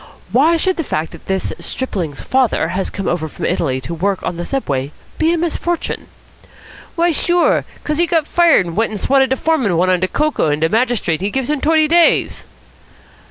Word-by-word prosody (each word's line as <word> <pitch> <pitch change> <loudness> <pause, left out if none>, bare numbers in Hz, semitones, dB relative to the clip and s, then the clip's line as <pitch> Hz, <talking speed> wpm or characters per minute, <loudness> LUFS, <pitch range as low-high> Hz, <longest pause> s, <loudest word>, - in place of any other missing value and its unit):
Why 300 - +4
should 375 +3 0
the 325 - -1
fact 160 - -3
that - - -13
this 190 -1 -2
stripling's 175 - -4
father 255 -10 +1
has 185 +2 -2
come 195 - -5
over 165 -2 -1
from - - -6
Italy 155 -7 0
to 165 - -6
work 190 +3 -1
on - - -3
the 175 +1 -5
Subway 140 - -2 0.3
be 320 +1 +3
a 345 - +1
misfortune?" 345 +1 -2 0.9
"Why, 340 0 +2
sure, 345 +3 +2
because 300 +1 -3
he 345 - +3
got 330 -3 +1
fired 335 - +4
an' 170 - -6
went 225 +5 +1
an' 215 - -4
swatted 265 +5 +2
de 265 - +2
foreman 260 - +1
one 185 +2 +2
on 180 - +2
de 185 - 0
coco, 300 - 0
an' 150 +1 -1
de 160 - +2
magistrate 225 -7 0
gives 265 +3 -1
him 300 -2 -1
t'oity 315 0 +3
days." 340 +1 +2
245 Hz, 200 wpm, -17 LUFS, -, 0.9 s, Why